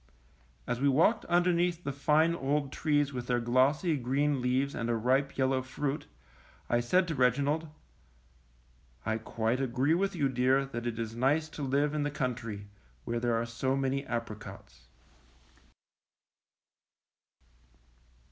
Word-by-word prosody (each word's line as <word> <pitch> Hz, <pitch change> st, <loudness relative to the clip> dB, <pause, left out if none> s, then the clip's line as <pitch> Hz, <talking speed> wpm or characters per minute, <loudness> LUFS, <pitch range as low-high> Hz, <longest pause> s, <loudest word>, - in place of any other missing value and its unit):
As 125 Hz, -, -2 dB
we 140 Hz, -, +4 dB
walked 170 Hz, -, +3 dB
underneath 175 Hz, 0 st, +2 dB
the 140 Hz, -, -2 dB
fine 150 Hz, +4 st, +2 dB
old 140 Hz, -2 st, -1 dB
trees 145 Hz, -2 st, +1 dB
with 125 Hz, -1 st, -5 dB
their 125 Hz, -1 st, +1 dB
glossy, 130 Hz, +8 st, +2 dB
green 135 Hz, +2 st, 0 dB
leaves 130 Hz, +3 st, 0 dB
and 115 Hz, -1 st, -2 dB
ripe 135 Hz, +2 st, +2 dB
yel 130 Hz, -1 st, +2 dB
low 130 Hz, -1 st, +1 dB
fruit, 140 Hz, +3 st, -3 dB, 0.6 s
I 120 Hz, -, +4 dB
said 180 Hz, +10 st, +2 dB
to 165 Hz, -, -2 dB
Reginald: 140 Hz, +5 st, +1 dB, 1.6 s
quite 115 Hz, +4 st, -1 dB
agree 130 Hz, +4 st, +1 dB
with 195 Hz, +3 st, 0 dB
you, 145 Hz, -5 st, +1 dB
dear, 130 Hz, +1 st, +2 dB
that 120 Hz, -3 st, -5 dB
it 115 Hz, -1 st, -3 dB
is 115 Hz, -1 st, -4 dB
nice 145 Hz, +6 st, +1 dB
to 155 Hz, -, -8 dB
live 140 Hz, +2 st, +1 dB
in 150 Hz, -, -1 dB
the 145 Hz, -, 0 dB
country, 120 Hz, -7 st, -4 dB, 0.4 s
where 120 Hz, -, -1 dB
there 120 Hz, -1 st, +1 dB
are 115 Hz, -, -1 dB
so 120 Hz, +3 st, -1 dB
many 135 Hz, 0 st, -1 dB
apricots. 105 Hz, -, -7 dB
135 Hz, 140 wpm, -30 LUFS, 120-150 Hz, 1.6 s, we